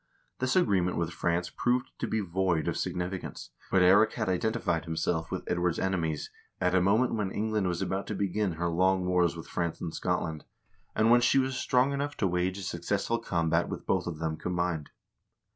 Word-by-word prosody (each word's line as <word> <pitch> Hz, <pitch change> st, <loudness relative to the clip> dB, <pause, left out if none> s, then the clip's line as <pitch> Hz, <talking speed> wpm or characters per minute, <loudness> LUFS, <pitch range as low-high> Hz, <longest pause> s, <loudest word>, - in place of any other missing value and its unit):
This 130 Hz, 0 st, 0 dB
agreement 95 Hz, -, +2 dB
with 85 Hz, 0 st, -1 dB
France 85 Hz, +1 st, -1 dB
proved 125 Hz, 0 st, 0 dB
to -, -, -1 dB
be 110 Hz, -, 0 dB
void 90 Hz, -3 st, 0 dB
of -, -, 0 dB
significance, 90 Hz, +1 st, -4 dB, 0.2 s
but 95 Hz, -, +4 dB
Eirik 100 Hz, +4 st, +6 dB
had -, -, -2 dB
identified 95 Hz, -3 st, 0 dB
himself 80 Hz, 0 st, -1 dB
with -, -, -4 dB
Edward's 85 Hz, -1 st, 0 dB
enemies 85 Hz, -5 st, -1 dB, 0.3 s
at 90 Hz, 0 st, +1 dB
a 95 Hz, -, +4 dB
moment 110 Hz, +7 st, +3 dB
when 105 Hz, -4 st, -1 dB
England 105 Hz, -1 st, -1 dB
was 85 Hz, -1 st, -1 dB
about 95 Hz, +1 st, -2 dB
to 105 Hz, -, -3 dB
begin 100 Hz, 0 st, 0 dB
her 85 Hz, +2 st, -2 dB
long 90 Hz, +2 st, +2 dB
wars 90 Hz, -2 st, +2 dB
with 80 Hz, -, -8 dB
France 85 Hz, -1 st, -2 dB
and 80 Hz, -, -5 dB
Scotland, 85 Hz, -4 st, -2 dB, 0.5 s
and 110 Hz, +2 st, +4 dB
when 120 Hz, 0 st, +6 dB
she 120 Hz, -, +4 dB
was 130 Hz, 0 st, +1 dB
strong 125 Hz, +2 st, +2 dB
enough 145 Hz, +1 st, -3 dB
to -, -, +1 dB
wage 90 Hz, +1 st, 0 dB
a 100 Hz, -, -6 dB
successful -, -, -1 dB
combat 85 Hz, -2 st, 0 dB
with -, -, -6 dB
both 90 Hz, -2 st, 0 dB
of 85 Hz, -3 st, -4 dB
them 80 Hz, 0 st, -2 dB
combined. 85 Hz, -4 st, -2 dB
90 Hz, 195 wpm, -29 LUFS, 85-105 Hz, 0.5 s, Eirik